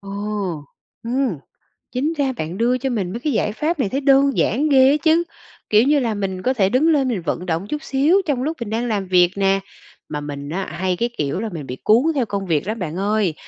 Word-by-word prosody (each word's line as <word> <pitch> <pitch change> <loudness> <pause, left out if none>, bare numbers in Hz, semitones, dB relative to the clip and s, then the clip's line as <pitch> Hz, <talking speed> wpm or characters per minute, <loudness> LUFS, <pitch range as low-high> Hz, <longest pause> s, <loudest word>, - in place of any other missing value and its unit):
Ồ! 200 0 -10 0.9
Ừm, 245 - -1 0.5
chính 285 +6 -1
ra 275 -2 +1
bạn 160 +4 -4
đưa 240 +3 +2
cho 265 +2 -2
mình 200 -7 -2
mấy 230 - -4
cái 295 +3 -1
giải 215 - 0
pháp 310 +7 -1
này 230 -7 +1
thấy 270 +6 -2
đơn 275 0 +4
giản 290 +8 +1
ghê 265 -1 +6
á 295 - +3
chứ, 330 +1 +4 0.5
kiểu 215 +1 +5
như 285 +2 +3
là, 230 -4 0
mình 195 -2 -3
có 255 +6 +1
thể 195 -7 +2
đứng 255 +9 +2
lên 285 -5 +3
mình 225 -7 -1
vận 170 +2 -3
động 170 +2 -2
chút 300 +6 -4
xíu 300 +9 +3
trong 265 -4 0
lúc 315 +3 -2
mình 235 -3 -5
đang 230 +3 -1
làm 205 -4 -1
việc 180 -1 +4
nè. 195 0 +2 0.5
Mà 150 -1 -4
mình 145 -1 -6
á, 190 +4 -3
hay 185 0 -1
cái 235 +4 0
kiểu 145 +3 -1
là 225 +1 -3
mình 160 -6 -7
bị 125 - -6
cuốn 225 +4 +5
theo 260 -4 +1
công 200 -2 -3
việc 160 0 0
lắm 220 +2 -3
bạn 165 -4 -4
ơi, 200 -2 0
225 Hz, 245 wpm, -20 LUFS, 185-270 Hz, 0.9 s, ghê